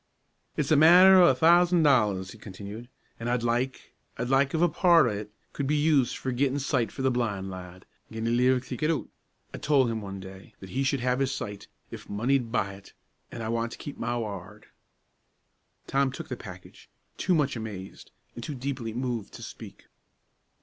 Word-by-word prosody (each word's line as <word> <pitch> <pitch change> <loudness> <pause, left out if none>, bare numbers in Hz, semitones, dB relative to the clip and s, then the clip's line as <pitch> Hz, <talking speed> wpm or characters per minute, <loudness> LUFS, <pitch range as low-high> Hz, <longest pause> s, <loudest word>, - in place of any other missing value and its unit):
"It's 150 -1 -1
a - - +6
matter 180 +5 +8
o' 175 - +7
a 130 - +4
thousan' 170 +4 +5
dollars," 105 -10 +2
he 115 - -13
continued, 105 +3 -9 0.3
"an' 115 - -4
I'd 120 -1 0
like 120 +2 -2 0.2
I'd 120 +1 -3
like 135 +2 +2
if - - 0
a 175 - +5
part 170 -1 +4
o' 120 - +1
it 105 0 -6 0.2
could 140 - -3
be 150 - +1
used 145 -4 +2
for 130 - -3
gettin' 135 +2 0
sight 130 -5 0
for 135 - -6
the 130 - +3
blin' 100 -6 -2
lad, 90 0 -10 0.3
gin 110 0 -4
he 115 - +1
lives 125 +1 +2
to 125 - -4
get 155 0 0
oot. 160 -4 -2 0.4
I - - -6
told 135 -5 +2
him, 110 -1 -3
one 100 -1 -7
day, 95 0 -12
that 95 -1 -11
he 135 - -1
should 135 -1 0
have 125 +1 0
his 135 -1 +1
sight, 105 -6 -6 0.2
if - - -10
money'd 120 +3 0
buy 100 -5 -1
it 100 0 -15 0.4
an' 115 - -6
I 110 - -3
want 115 0 -2
to - - -9
keep 145 - -8
ma 120 +1 -1
ward." 105 -2 -7 1.2
Tom 135 -1 +1
took - - -8
the 125 - -3
package, 90 -6 -12 0.3
too 185 - +1
much 145 -5 +1
amazed, 105 -4 -8 0.2
and 120 - -8
too 145 - -5
deeply 125 -4 -4
moved 120 -4 -3
to - - -10
speak. - - -11
125 Hz, 205 wpm, -27 LUFS, 105-140 Hz, 1.2 s, matter